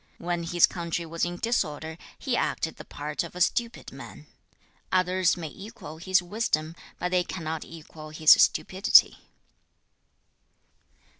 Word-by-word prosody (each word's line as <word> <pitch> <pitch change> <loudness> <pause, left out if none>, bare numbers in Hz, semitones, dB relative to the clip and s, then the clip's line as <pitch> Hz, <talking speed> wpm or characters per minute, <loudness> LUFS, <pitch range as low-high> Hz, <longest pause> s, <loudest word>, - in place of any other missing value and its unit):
When 175 0 -3
his 170 0 +4
country 170 -1 -4
was 165 +1 -2
in 175 0 -4
disorder, 160 -8 -2 0.2
he - - -2
acted - - -1
the - - -10
part 150 +2 -4
of 170 - -10
a - - -6
stupid 235 +6 0
man. - - -11 0.7
Others 185 0 +2
may 165 -3 -5
equal 195 -4 -10
his 185 +1 +2
wisdom, 170 -5 -2 0.2
but 180 +1 -3
they 180 -1 +2
cannot 160 -3 -5
equal 155 -1 -11
his 155 0 +4
stupidity.' 190 +2 +5
175 Hz, 135 wpm, -27 LUFS, 160-185 Hz, 0.7 s, stupidity